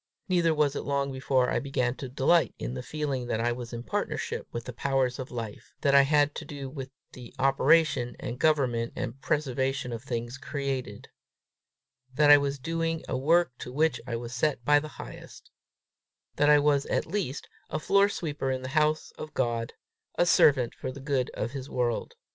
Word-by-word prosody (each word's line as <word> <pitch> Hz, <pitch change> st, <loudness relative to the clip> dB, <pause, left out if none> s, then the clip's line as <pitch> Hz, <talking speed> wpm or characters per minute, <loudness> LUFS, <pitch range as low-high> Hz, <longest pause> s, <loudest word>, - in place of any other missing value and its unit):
Neither 175 Hz, -3 st, +3 dB
was 150 Hz, -2 st, +2 dB
it -, -, -2 dB
long 140 Hz, -1 st, -1 dB
before 130 Hz, -1 st, +1 dB
I -, -, +1 dB
began 125 Hz, -3 st, -1 dB
to 135 Hz, -, -6 dB
delight 140 Hz, +6 st, +2 dB
in -, -, -4 dB
the 65 Hz, -, -4 dB
feeling 140 Hz, -5 st, -3 dB
that 110 Hz, -, -1 dB
I 120 Hz, +1 st, +1 dB
was 120 Hz, 0 st, -6 dB
in 120 Hz, -1 st, -6 dB
partnership -, -, -3 dB
with 120 Hz, 0 st, -5 dB
the 125 Hz, -, -6 dB
powers 130 Hz, 0 st, 0 dB
of 130 Hz, -, -5 dB
life; 115 Hz, -4 st, -7 dB
that 140 Hz, -, +3 dB
I 140 Hz, -, +9 dB
had 145 Hz, +1 st, +3 dB
to -, -, -5 dB
do 140 Hz, -2 st, -7 dB
with 135 Hz, -2 st, -6 dB, 0.2 s
the 125 Hz, -2 st, -12 dB
operation 135 Hz, -1 st, +3 dB
and 120 Hz, +1 st, -5 dB
government 130 Hz, -7 st, +1 dB
and 130 Hz, +1 st, -5 dB
preservation 135 Hz, -3 st, -1 dB
of 115 Hz, 0 st, -6 dB
things 120 Hz, 0 st, -4 dB
created; 135 Hz, -1 st, -4 dB, 1.1 s
that 145 Hz, 0 st, +6 dB
I 145 Hz, -, +9 dB
was 140 Hz, 0 st, -1 dB
doing 165 Hz, +3 st, -2 dB
a -, -, -2 dB
work 160 Hz, +4 st, +3 dB
to 125 Hz, -, -7 dB
which 155 Hz, +4 st, +1 dB
I 120 Hz, -, -2 dB
was 120 Hz, +1 st, -6 dB
set 125 Hz, -1 st, 0 dB
by 145 Hz, +1 st, +6 dB
the 150 Hz, 0 st, -9 dB
Highest; -, -, -10 dB, 0.8 s
that 145 Hz, -, +3 dB
I 150 Hz, -, +8 dB
was 145 Hz, -1 st, +2 dB
at -, -, 0 dB
least 165 Hz, -6 st, -3 dB, 0.2 s
a -, -, -2 dB
floor 200 Hz, +5 st, +3 dB
sweeper 150 Hz, -8 st, -3 dB
in 130 Hz, -1 st, -2 dB
the 130 Hz, -, -4 dB
house 155 Hz, +2 st, +1 dB
of 155 Hz, -, -8 dB
God, 115 Hz, -2 st, -1 dB, 0.4 s
a 175 Hz, -, +3 dB
servant 135 Hz, -7 st, +4 dB
for 130 Hz, -, -5 dB
the 135 Hz, -, -10 dB
good 135 Hz, -2 st, -1 dB
of 115 Hz, -, -3 dB
his 135 Hz, 0 st, -6 dB
world. 120 Hz, -2 st, -1 dB
135 Hz, 195 wpm, -28 LUFS, 125-150 Hz, 1.1 s, I